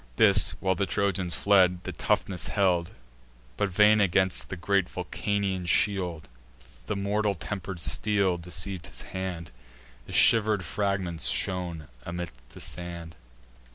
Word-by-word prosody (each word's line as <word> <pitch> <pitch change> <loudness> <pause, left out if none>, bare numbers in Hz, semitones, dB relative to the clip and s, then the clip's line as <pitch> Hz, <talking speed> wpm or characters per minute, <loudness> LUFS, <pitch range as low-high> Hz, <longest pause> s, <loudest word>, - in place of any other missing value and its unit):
This, 105 -2 +5
while 95 -1 +1
the 95 +2 -1
Trojans 95 -3 0
fled, 90 -3 +3
the - - -5
toughness 95 -3 -1
held; 90 -4 +1 0.7
But, 100 - 0
vain 105 +3 +5
against 95 -1 +2
the - - -4
great 95 +2 +1
Vulcanian 100 -3 -2
shield, 90 -3 +1 0.6
The - - -1
mortal 100 +1 0
temper'd 95 0 -6
steel 95 +1 +1
deceiv'd 90 +1 -3
his - - -7
hand: 90 -5 -5 0.6
The - - -10
shiver'd 105 -4 +4
fragments 95 -5 -1
shone 90 -5 -2 0.2
amid 85 0 -5 0.2
the - - -13
sand. 85 -2 -7
95 Hz, 125 wpm, -27 LUFS, 85-100 Hz, 0.7 s, This